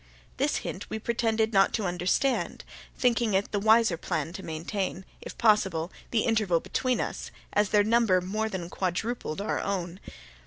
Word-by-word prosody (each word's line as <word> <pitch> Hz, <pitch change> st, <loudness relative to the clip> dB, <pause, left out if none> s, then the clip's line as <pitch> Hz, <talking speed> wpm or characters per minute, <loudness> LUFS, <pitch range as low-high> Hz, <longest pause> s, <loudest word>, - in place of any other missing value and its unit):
This -, -, +1 dB
hint -, -, -5 dB
we -, -, -3 dB
pretended 225 Hz, 0 st, 0 dB
not 195 Hz, 0 st, +4 dB
to 215 Hz, -, -1 dB
understand, 180 Hz, +9 st, 0 dB, 0.3 s
thinking 235 Hz, -4 st, +2 dB
it 195 Hz, +1 st, 0 dB
the 205 Hz, -, 0 dB
wiser 220 Hz, -3 st, +4 dB
plan 160 Hz, -1 st, -3 dB
to 190 Hz, -, -6 dB
maintain, 185 Hz, +3 st, -4 dB, 0.2 s
if -, -, -9 dB
possible, 190 Hz, -7 st, +2 dB, 0.2 s
the 230 Hz, -, +2 dB
interval 215 Hz, -7 st, +2 dB
between 255 Hz, +7 st, -1 dB
us, -, -, -4 dB, 0.2 s
as 210 Hz, -1 st, +2 dB
their 210 Hz, -1 st, +4 dB
number 220 Hz, -4 st, +3 dB
more 215 Hz, +5 st, -2 dB
than 185 Hz, -4 st, -4 dB
quadrupled 190 Hz, 0 st, -3 dB
our 210 Hz, -, -1 dB
own. 185 Hz, -2 st, -3 dB
205 Hz, 160 wpm, -28 LUFS, 180-225 Hz, 0.3 s, not